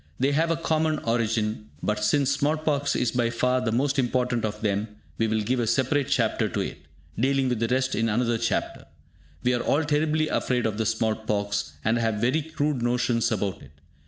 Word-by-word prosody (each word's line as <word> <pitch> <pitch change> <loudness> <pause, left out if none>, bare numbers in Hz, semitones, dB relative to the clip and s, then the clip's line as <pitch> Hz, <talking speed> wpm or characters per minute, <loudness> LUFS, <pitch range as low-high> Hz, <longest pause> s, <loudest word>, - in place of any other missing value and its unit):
They 135 +2 +2
have 160 +4 +2
a 165 - +2
common 160 -1 +1
origin, 110 -3 -1
but, 105 0 -1
since 140 +3 +2
small 145 +3 +1
pox 150 -2 0
is 125 - +1
by 120 -2 +1
far 125 +2 +1
the 120 -3 -1
most 135 +4 +1
important 125 -2 0
of 105 -1 -3
them, 105 0 0 0.3
we 115 - +2
will 110 0 0
give 125 +4 0
a 115 - 0
separate 130 +3 +1
chapter 120 -6 +1
to - - -3
it, - - -4 0.4
dealing 135 +1 +2
with 125 -3 -1
the 115 - +1
rest 130 +2 0
in 115 0 +1
another 115 +1 +1
chapter. 115 -2 -2 0.6
We 125 - +2
are 120 - 0
all 150 +3 +1
terribly 155 +1 +1
afraid 125 -5 0
of 110 -1 -1
the 110 - +1
small 110 0 +1
pox, 100 -2 -2
and 115 +2 +2
have 115 -2 0
very 125 +9 +1
crude 150 -3 -2
notions 120 -1 +1
about 100 -2 -2
it. - - -15
120 Hz, 205 wpm, -26 LUFS, 110-140 Hz, 0.6 s, They